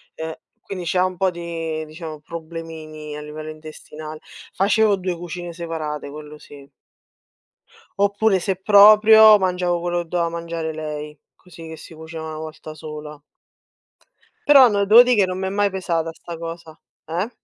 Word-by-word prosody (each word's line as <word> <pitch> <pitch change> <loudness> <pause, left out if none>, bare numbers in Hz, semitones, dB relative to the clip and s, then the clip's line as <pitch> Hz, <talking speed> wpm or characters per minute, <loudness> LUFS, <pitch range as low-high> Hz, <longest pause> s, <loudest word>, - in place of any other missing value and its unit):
uhm, 160 0 -5 0.3
quindi 185 -2 -7
c'ha 180 +2 +2
un 185 0 -3
po' 185 +1 +1
di, 165 -2 -5
diciamo, 155 0 -9
problemini 160 -1 -8
a 150 - -7
livello 155 +1 -8
intestinale, 155 0 -10 0.3
facevo 205 +1 +2
2 185 -1 -3
cucine 175 0 -7
separate, 160 -4 -5
quello 150 +1 -10
sì. 140 -2 -15 1.3
Oppure, 200 0 +2
se 190 +2 -1
proprio, 215 +2 +7
mangiavo 180 -2 0
quello 175 0 -1
che - - -20
doveva 170 -1 0
mangiare 165 -1 -4
lei, 150 -1 -6 0.2
così 180 -2 -15
che 160 - -9
si 160 - -13
cuoceva 160 0 -8
1 155 0 -6
volta 155 0 -9
sola. 150 -1 -9 1.3
Però 275 -4 +8
no, 200 -1 +1
devo 225 +4 +8
di 250 0 +2
che 200 - +4
non 185 0 -4
mi 190 - -3
è - - -1
mai 205 +1 +1
pesata 170 -4 -2
'sta 170 0 -9
cosa. 165 -1 -8 0.3
Eh? 175 +8 -3
170 Hz, 160 wpm, -21 LUFS, 155-190 Hz, 1.3 s, Però